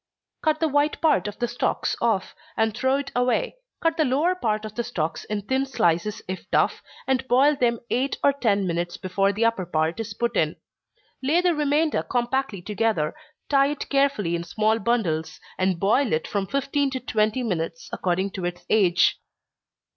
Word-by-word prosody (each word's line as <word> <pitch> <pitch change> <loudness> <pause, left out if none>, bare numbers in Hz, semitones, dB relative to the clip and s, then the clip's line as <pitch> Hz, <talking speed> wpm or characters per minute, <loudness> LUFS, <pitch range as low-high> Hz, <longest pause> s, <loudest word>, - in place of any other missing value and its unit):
_ - - -56
Cut 310 -1 +1
the 320 - +2
white 290 +1 +1
part 310 -9 +2
of 205 - -6
the 240 - -1
stalks 240 - -1
off, 225 -5 0 0.2
and 220 -1 +1
throw 260 +2 +2
it 280 0 -3
away 250 - +1 0.2
cut 330 0 +1
the 315 - +4
lower 295 +7 +2
part 220 -11 -1
of 215 - -7
the 240 - -2
stalks 165 -9 -3
in 210 -1 -3
thin 265 +5 0
slices 175 -4 0
if 185 0 -6
tough, - - +2 0.2
and 265 0 0
boil 270 +5 +4
them 235 -3 +1
eight 260 +3 0
or 280 - +5
ten 210 -8 +1
minutes 175 0 -2
before 195 +2 +1
the 215 +3 0
upper 230 -5 +1
part 160 +3 -1
is 225 -2 -5
put 235 +1 -1
in. 155 -3 +1 0.7
Lay 290 +6 +2
the 355 -1 +3
remainder 300 +1 +1
compactly 245 -5 -1
together, 210 -6 0 0.3
tie 275 -1 +4
it 290 0 -4
carefully 275 -11 +1
in 170 - -3
small 215 +6 +1
bundles, 190 -9 -1 0.2
and 185 -2 +1
boil 225 +6 +2
it 155 - 0
from 200 -2 -2
fifteen 275 +2 0
to 265 -1 -3
twenty 220 0 0
minutes, 165 -6 -3
according 185 +2 -1
to 190 -2 -6
its 175 0 -4
age. 180 -5 +4
225 Hz, 185 wpm, -24 LUFS, 190-275 Hz, 0.7 s, or